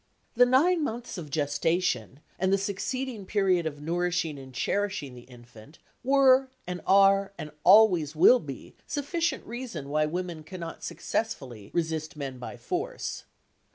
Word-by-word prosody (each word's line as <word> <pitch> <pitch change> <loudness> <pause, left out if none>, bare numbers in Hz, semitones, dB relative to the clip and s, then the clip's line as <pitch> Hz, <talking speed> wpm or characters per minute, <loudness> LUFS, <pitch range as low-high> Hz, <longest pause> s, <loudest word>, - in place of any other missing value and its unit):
The 245 +1 +5
nine 315 +7 +3
months 235 -6 -4
of 155 -4 -8
gestation 150 -2 -1 0.2
and 190 +1 +1
the 195 - +4
succeeding 210 +4 -3
period 185 -5 +2
of 145 -2 -6
nourishing 170 -2 -1
and 130 -1 -11
cherishing 145 +2 -2
the 125 +1 -14
infant 120 +2 -15 0.3
were, 265 0 +5 0.2
and 180 0 -5
are, 195 0 +5
and 150 - -7
always 180 -7 +6
will 245 +10 +7
be 140 - -9
sufficient 330 +4 -2
reason 230 - -6
why 155 +1 +1
women 175 0 -4
cannot 170 0 -8
successfully 125 - -4
resist 160 -2 -2
men 135 -3 -5
by 125 - -7
force. 430 +8 -4
180 Hz, 140 wpm, -27 LUFS, 150-225 Hz, 0.3 s, will